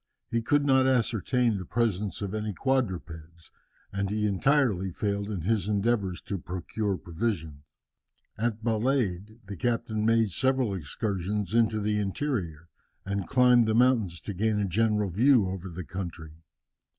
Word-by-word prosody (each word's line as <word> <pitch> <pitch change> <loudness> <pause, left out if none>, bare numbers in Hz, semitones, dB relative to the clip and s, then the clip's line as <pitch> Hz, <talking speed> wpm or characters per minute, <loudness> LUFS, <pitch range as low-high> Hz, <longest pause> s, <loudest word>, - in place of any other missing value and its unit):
He 115 - +1
could 145 +5 +2
not 130 -1 +4
ascertain 120 -2 +1
the - - -5
presence 105 -2 -1
of 100 0 -4
any 105 -1 -2
quadrupeds, 85 - -3 0.4
and 100 0 -1
he 105 +1 0
entirely 105 -3 +2
failed 100 +2 -2
in 100 -5 -3
his 105 +3 0
endeavours 100 -3 0
to 100 - -4
procure 95 +3 -3
provisions. 80 -5 -3 0.7
At 110 0 -2
Balade 110 -3 -1
the 100 +1 -7
captain 110 +1 -1
made 115 -2 +3
several 130 +1 +1
excursions 95 +3 -3
into 115 -2 +3
the 105 0 0
interior, 95 - -3 0.4
and 100 -1 -2
climbed 125 -3 +5
the 110 - +1
mountains 115 -9 +3
to 105 - -5
gain 105 +3 0
a 100 - +1
general 105 +1 +1
view 120 +2 +4
over 95 0 -5
the 90 0 -7
country. 85 -4 -6
105 Hz, 145 wpm, -28 LUFS, 95-115 Hz, 0.7 s, climbed